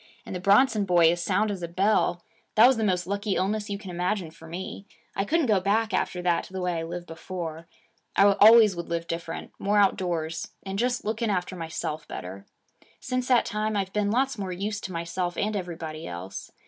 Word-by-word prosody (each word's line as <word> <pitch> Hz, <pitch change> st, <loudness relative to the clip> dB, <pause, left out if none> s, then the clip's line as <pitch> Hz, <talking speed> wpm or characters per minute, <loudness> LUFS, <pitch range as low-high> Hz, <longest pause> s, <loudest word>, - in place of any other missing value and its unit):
And -, -, -6 dB
the -, -, -3 dB
Bronson 205 Hz, +4 st, +4 dB
boy 175 Hz, -3 st, +5 dB
as 175 Hz, 0 st, -2 dB
sound 210 Hz, +4 st, +1 dB
as 195 Hz, -3 st, -5 dB
a 170 Hz, -, -3 dB
bell. 180 Hz, 0 st, +1 dB, 0.3 s
That 220 Hz, -, +8 dB
was 260 Hz, +1 st, +6 dB
the 220 Hz, -, 0 dB
most 180 Hz, -4 st, +1 dB
lucky 200 Hz, +1 st, -1 dB
illness 210 Hz, +3 st, -1 dB
you 200 Hz, -, -2 dB
can 195 Hz, -3 st, -9 dB
imagine 180 Hz, 0 st, -2 dB
for 165 Hz, 0 st, -14 dB
me. 185 Hz, +4 st, -7 dB, 0.3 s
I 195 Hz, -, 0 dB
couldn't 325 Hz, +5 st, +2 dB
go 210 Hz, -5 st, +3 dB
back 215 Hz, +3 st, +1 dB
after 180 Hz, -1 st, -1 dB
that 175 Hz, -1 st, +2 dB
to -, -, -15 dB
the 190 Hz, -, -3 dB
way 180 Hz, -2 st, -1 dB
I -, -, -3 dB
lived 175 Hz, +1 st, -6 dB
before. 165 Hz, -1 st, -6 dB, 0.5 s
I -, -, +6 dB, 0.2 s
always 220 Hz, -2 st, +8 dB
would 170 Hz, 0 st, -6 dB
live 170 Hz, 0 st, -2 dB
different 165 Hz, 0 st, -5 dB
more 205 Hz, +1 st, +1 dB
outdoors, 170 Hz, -5 st, +1 dB, 0.2 s
and 195 Hz, 0 st, -4 dB
just 245 Hz, +1 st, 0 dB
looking 220 Hz, +1 st, -1 dB
after 185 Hz, -1 st, -1 dB
myself 160 Hz, -2 st, -4 dB
better. 95 Hz, +2 st, -8 dB, 0.5 s
Since 255 Hz, 0 st, -2 dB
that 250 Hz, -2 st, +4 dB
time, 215 Hz, 0 st, -1 dB
I've 190 Hz, -1 st, -2 dB
been 210 Hz, -1 st, +1 dB
lots 260 Hz, +2 st, +1 dB
more 190 Hz, -2 st, -3 dB
use 205 Hz, +3 st, -3 dB
to 190 Hz, -, -6 dB
myself 175 Hz, +1 st, -3 dB
and 210 Hz, +1 st, 0 dB
everybody 165 Hz, -4 st, -5 dB
else. 90 Hz, +3 st, -7 dB
190 Hz, 210 wpm, -26 LUFS, 170-210 Hz, 0.5 s, That